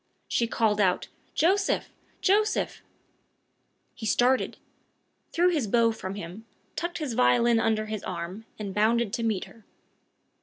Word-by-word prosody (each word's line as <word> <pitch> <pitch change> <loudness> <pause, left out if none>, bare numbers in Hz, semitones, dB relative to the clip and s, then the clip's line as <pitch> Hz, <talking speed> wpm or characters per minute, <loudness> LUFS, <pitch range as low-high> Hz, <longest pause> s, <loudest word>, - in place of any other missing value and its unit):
She 235 - +1
called 215 -2 +1
out, 185 -2 +1 0.3
"Joseph! 390 +4 +2 0.3
Joseph!" 425 +2 +1 1.1
He 220 - -5
started, 250 +5 +2 0.7
threw 350 +2 +3
his 300 -10 0
bow 230 +2 +3
from 195 -3 -6
him, 200 +4 -8 0.3
tucked 345 0 -3
his 300 -7 -3
violin 225 - +4
under 220 -1 +1
his 215 -1 -5
arm, 180 +4 -5
and 200 -3 -5
bounded 220 +1 +2
to - - -1
meet 220 -4 0
her. 225 - -17
225 Hz, 130 wpm, -27 LUFS, 205-250 Hz, 1.1 s, violin